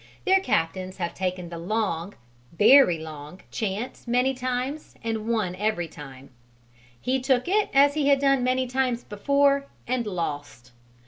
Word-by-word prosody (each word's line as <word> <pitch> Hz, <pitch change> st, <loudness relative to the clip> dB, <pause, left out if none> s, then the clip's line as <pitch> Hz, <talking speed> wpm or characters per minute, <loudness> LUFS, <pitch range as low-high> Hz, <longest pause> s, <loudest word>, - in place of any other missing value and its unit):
Their 385 Hz, 0 st, +5 dB
captains 185 Hz, -, -1 dB
have 170 Hz, -3 st, -3 dB
taken 185 Hz, -2 st, -3 dB
the 170 Hz, -1 st, -7 dB
long 190 Hz, -1 st, -2 dB, 0.4 s
very 225 Hz, -4 st, +7 dB
long 155 Hz, +2 st, -9 dB
chance 215 Hz, +4 st, -4 dB
many 250 Hz, +3 st, +2 dB
times 255 Hz, +3 st, -4 dB
and 225 Hz, -1 st, -3 dB
won 215 Hz, -6 st, 0 dB
every 205 Hz, -4 st, -1 dB
time; 140 Hz, -4 st, -12 dB, 0.7 s
he 260 Hz, -, 0 dB
took 255 Hz, +1 st, +1 dB
it 415 Hz, +3 st, +2 dB
as 280 Hz, +1 st, +5 dB
he 295 Hz, -2 st, 0 dB
had 280 Hz, -1 st, +5 dB
done 275 Hz, -2 st, +2 dB
many 255 Hz, +1 st, +1 dB
times 255 Hz, -1 st, -1 dB
before, 280 Hz, +6 st, +1 dB, 0.2 s
and 245 Hz, -2 st, -1 dB
lost. 145 Hz, -, -5 dB
225 Hz, 145 wpm, -25 LUFS, 175-265 Hz, 0.7 s, very